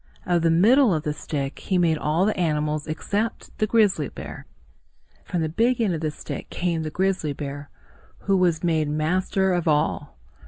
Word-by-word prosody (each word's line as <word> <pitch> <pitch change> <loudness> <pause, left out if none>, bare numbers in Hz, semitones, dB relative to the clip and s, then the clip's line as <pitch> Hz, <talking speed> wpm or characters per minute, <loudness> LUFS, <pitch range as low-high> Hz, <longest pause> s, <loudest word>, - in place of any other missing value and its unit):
Of 175 -2 +2
the 165 - +3
middle 215 - +5
of 155 - -2
the 150 - -1
stick, 140 -2 -4
he 190 - -1
made 165 -3 +2
all 160 +5 +1
the 215 - +1
animals 150 -3 -1
except 205 +8 -3
the 215 - +2
grizzly 215 -3 +2
bear. - - -9 0.8
From 175 -4 -1
the - - 0
big 230 +10 +1
end 215 -6 +1
of 160 - -3
the 155 - 0
stick 150 - -7
came 170 -2 -1
the 155 - -3
grizzly 185 -3 0
bear, 145 0 -6 0.5
who 195 - +1
was 175 -3 +2
made 160 -3 +1
master 185 +5 +1
of 175 -2 -1
all. 150 - 0
165 Hz, 185 wpm, -24 LUFS, 155-190 Hz, 0.8 s, middle